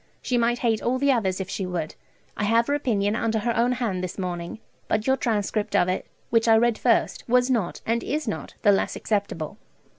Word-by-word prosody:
She 250 - 0
might 240 0 +2
hate 225 -2 +2
all 250 +2 0
the 280 +1 +3
others, 195 -7 0
if 190 - -3
she 190 - -3
would. 170 -4 -3 0.4
I 210 - -1
have 230 +2 +3
her 285 - 0
opinion 215 -8 0
under 225 -1 0
her 230 +2 -1
own 240 +2 +2
hand 220 -8 -2
this 180 - -5
morning, 175 -1 -4 0.3
but 215 0 0
your 265 - +3
transcript 215 -4 -1
of 175 - +4
it, 185 - -2 0.2
which 230 0 +3
I 225 -1 +7
read 235 0 +2
first, 235 -2 +1
was 250 +1 +3
not, 220 -8 -1
and 230 +1 0
is 305 +3 -2
not, - - -4
the 205 - +6
less 195 - +1
acceptable. 200 -7 -2
225 Hz, 215 wpm, -25 LUFS, 195-240 Hz, 0.4 s, I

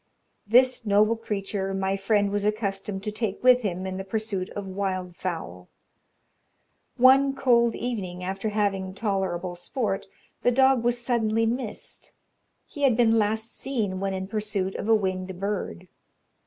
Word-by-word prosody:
This 250 +2 +4
noble 210 +1 +3
creature 195 -3 -3
my 195 0 0
friend 200 +1 +1
was 205 0 -1
accustomed 200 -2 -2
to 210 - -2
take 210 -1 -3
with 250 0 +6
him 185 -4 -3
in 190 0 -4
the 190 - -4
pursuit 200 -2 -3
of 205 - -4
wild 185 -2 -3
fowl. 90 - -5 1.3
One 270 +2 +6
cold 235 -4 +3
evening, 190 -7 -4
after 195 +3 -2
having 195 -3 -1
tolerable 190 -4 -2
sport, 195 +2 -3 0.3
the 245 - +3
dog 265 -1 +4
was 240 0 +1
suddenly 225 -2 +1
missed; 235 -1 -4 0.5
he 290 - -10
had 260 -5 +4
been 225 -2 +4
last 220 +2 -1
seen 215 -9 -2
when 195 0 -1
in 190 0 -3
pursuit 205 -2 -2
of 215 - -4
a 225 - +7
winged 185 -2 -2
bird. 195 - -3
205 Hz, 150 wpm, -26 LUFS, 190-230 Hz, 1.3 s, a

